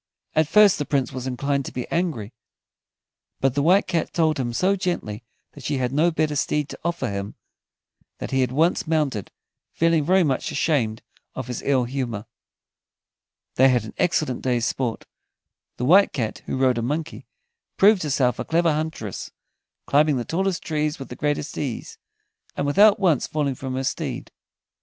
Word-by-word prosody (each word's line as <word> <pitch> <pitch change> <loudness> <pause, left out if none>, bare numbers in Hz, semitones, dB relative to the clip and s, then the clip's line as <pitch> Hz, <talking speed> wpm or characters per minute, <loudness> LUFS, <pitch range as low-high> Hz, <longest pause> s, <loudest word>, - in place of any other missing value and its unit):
At 155 -1 +2
first 205 +2 +5
the 145 - -1
Prince 135 -4 0
was 130 0 -5
inclined 140 +2 -1
to - - -6
be 125 - -5
angry, 155 - -2 1.1
but 135 -2 +2
the 140 - 0
White 180 +7 +4
Cat 170 -4 -1
told 160 -4 +1
him 120 -2 -1
so 185 +11 +2
gently 175 - -3 0.3
that - - -13
she 145 - -1
had 125 -1 -1
no 155 +5 +3
better 155 -2 0
steed 150 +1 0
to - - -9
offer 170 0 -1
him, 100 +1 -5 0.8
that - - -6
he 135 0 +2
at 125 - 0
once 160 +6 +1
mounted, 150 - -1 0.4
feeling 165 -2 +2
very 185 +4 +4
much 135 -5 -1
ashamed 115 -9 0 0.3
of 130 - -4
his 125 0 -5
ill 135 -3 +2
humor. 120 -4 -4 1.3
They 130 +1 +6
had 125 -3 +2
an 110 - -9
excellent 155 -7 0
day's 120 -2 0
sport. 125 -4 -2 0.7
The 125 - -2
White 190 +8 +5
Cat, 115 -5 -3
who - - -2
rode 130 -2 +2
a - - -1
monkey, 150 +7 -4 0.5
proved 200 0 +5
herself 135 -5 +1
a - - -1
clever 165 -1 +2
huntress, 150 - -4 0.6
climbing 150 0 +3
the 120 - -3
tallest 190 +1 -1
trees 150 -1 -1
with 135 - -9
the 125 - -7
greatest 145 +2 -2
ease, 130 -6 -5 0.6
and 140 - 0
without 200 +9 +5
once 170 -9 +2
falling 145 -3 -1
from 130 0 -5
her 130 - -2
steed. - - -4
145 Hz, 175 wpm, -23 LUFS, 125-165 Hz, 1.3 s, They